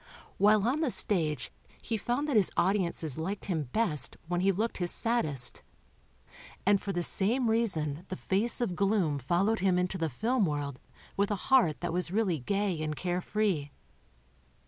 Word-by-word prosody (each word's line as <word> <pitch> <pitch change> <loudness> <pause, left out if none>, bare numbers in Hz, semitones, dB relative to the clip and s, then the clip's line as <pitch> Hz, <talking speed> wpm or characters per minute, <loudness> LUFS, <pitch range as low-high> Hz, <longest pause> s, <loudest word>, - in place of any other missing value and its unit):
While 210 +1 +4
on 280 +6 0
the 310 - +1
stage 155 - +1 0.3
he 230 - -3
found 245 +7 -2
that 285 - -1
his 205 -4 +4
audiences 170 -7 0
liked 195 +5 -4
him 160 -6 -2
best 210 -10 +1
when 175 +1 -1
he 195 +1 +3
looked 215 +5 -2
his 175 -1 +1
saddest. 155 - +1 1.0
And 200 0 +3
for 200 - -3
the 175 -2 -1
same 225 +7 +2
reason 170 -9 -1
the 185 - -5
face 205 +7 0
of 200 -7 -1
gloom 195 -7 +1
followed 180 - +1
him 185 -1 +2
into 180 +1 -1
the 165 -1 0
film 220 - 0
world 145 -3 -3 0.4
with 200 0 +1
a 205 - 0 0.2
heart 175 - +4
that 175 -1 -3
was 180 0 -1
really 190 -5 0
gay 195 +3 -1
and 155 -1 -3
carefree. 180 -2 -1
190 Hz, 170 wpm, -29 LUFS, 160-215 Hz, 1.0 s, While